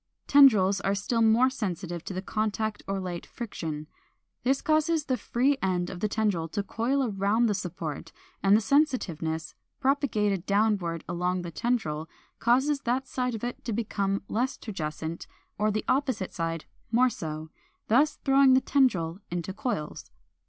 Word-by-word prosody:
Tendrils 205 -9 +6
are 200 0 +1
still 215 +4 0
more 230 +4 +5
sensitive 175 -8 -4
to 185 -1 -4
contact 215 0 -2
or 195 0 -1
light 180 -2 -4
friction. 160 -10 -6 0.6
This 265 +2 +2
causes 310 0 +1
the 260 - +1
free 265 +3 +1
end 180 -1 0
of 185 - -7
the 215 - +1
tendril 205 -6 0
to 205 - -1
coil 240 +5 0
round 205 +4 +2
the 210 - +1
support, 165 -4 -5 0.3
and 200 +1 +5
the - - 0
sensitiveness, 180 - 0 0.3
propagated 215 - +1
downward 200 -5 +1
along 180 +1 -1
the 170 - -6
tendril, 160 -7 -1 0.3
causes 265 +5 +2
that 255 +2 0
side 250 -2 -2
of 220 - -7
it 245 0 -4
to 230 - -3
become 200 -3 -1
less 255 +4 -1
turgescent 160 -4 -5 0.3
or 210 +1 +2
the 215 0 -2
opposite 260 -8 0
side 165 -1 -3 0.3
more 250 +2 +4
so, 155 -3 -6 0.4
thus 290 +7 +4
throwing 270 -1 +6
the - - +6
tendril 185 - +1
into 175 +2 -3
coils. 205 -8 -4
210 Hz, 150 wpm, -28 LUFS, 175-250 Hz, 0.6 s, Tendrils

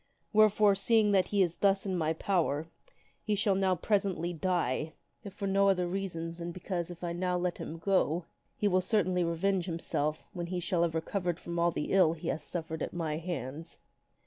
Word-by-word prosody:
Wherefore, 215 -1 +5
seeing 210 +2 +3
that 190 -2 +3
he 200 -2 +3
is 175 -2 -2
thus 195 0 +2
in 190 -2 -1
my 160 -2 +1
power, 160 -4 0 0.6
he 210 - 0
shall 200 0 +2
now 190 -1 +2
presently 185 -2 0
die; 160 -3 -1 0.3
if 200 - -7
for 200 +1 -5
no 195 0 +3
other 180 -2 +2
reason 175 -3 -3
than 170 0 -6
because 175 -1 -4
if 175 0 -10
I 170 -1 -2
now 180 +1 0
let 175 -1 -2
him 165 - -6
go 170 -1 +1
free, 165 - -27 0.3
he 210 - +1
will 185 -2 +3
certainly 185 -2 +1
revenge 175 +2 0
himself 155 -3 -2
when 175 -3 -4
he 180 0 -2
shall 175 0 0
have 170 -1 +1
recovered 175 +1 -2
from 170 0 -4
all 170 0 +4
the 155 - -3
ill 185 -5 +5
he 165 - -5
hath 155 - -2
suffered 160 0 -5
at - - -3
my 160 -3 -2
hands." 160 -2 -5
180 Hz, 200 wpm, -31 LUFS, 165-195 Hz, 0.6 s, Wherefore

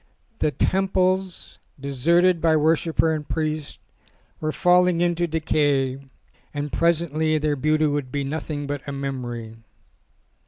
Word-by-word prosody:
The - - +2
temples, 185 +2 0 0.2
deserted 165 +6 +2
by 160 -1 +4
worshipper 160 +1 +2
and 150 -2 -5
priest, 155 -2 -3 0.6
were 155 0 -1
falling 180 0 +3
into 175 0 +1
decay 145 -4 0 0.6
and 145 0 -4
presently 160 -2 +1
their 150 -1 0
beauty 155 +3 +1
would 145 -3 -1
be 140 +1 -2
nothing 145 0 -4
but 145 -1 -4
a - - -3
memory. 120 -5 -5
155 Hz, 120 wpm, -23 LUFS, 145-170 Hz, 0.6 s, by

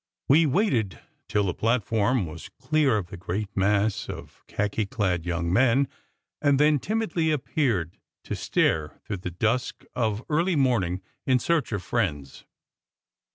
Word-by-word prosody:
We 155 +4 +5
waited 130 - +1 0.3
till 105 - +1
the 90 -3 0
plat 115 +3 +1
form 115 +1 +1
was 80 - -9
clear 150 -7 +1
of 90 -4 -4
the 100 - -7
great 100 +4 -4
mass 100 +2 +1
of - - -9
khaki 105 +1 -1
clad 90 -5 -1
young 85 0 -1
men, 130 +5 +4 0.5
and 140 -2 +3
then 150 0 +4
timidly 185 - 0
appeared, 125 - 0 0.2
to - - -4
stare 75 -1 0
through 105 - -3
the 90 0 -5
dusk 115 +8 -1
of 110 -2 0
early 170 +4 +1
morning 100 - +1 0.2
in 130 -1 +5
search 160 +3 0
of 100 -4 -2
friends. 75 - -2
110 Hz, 150 wpm, -26 LUFS, 95-140 Hz, 0.5 s, We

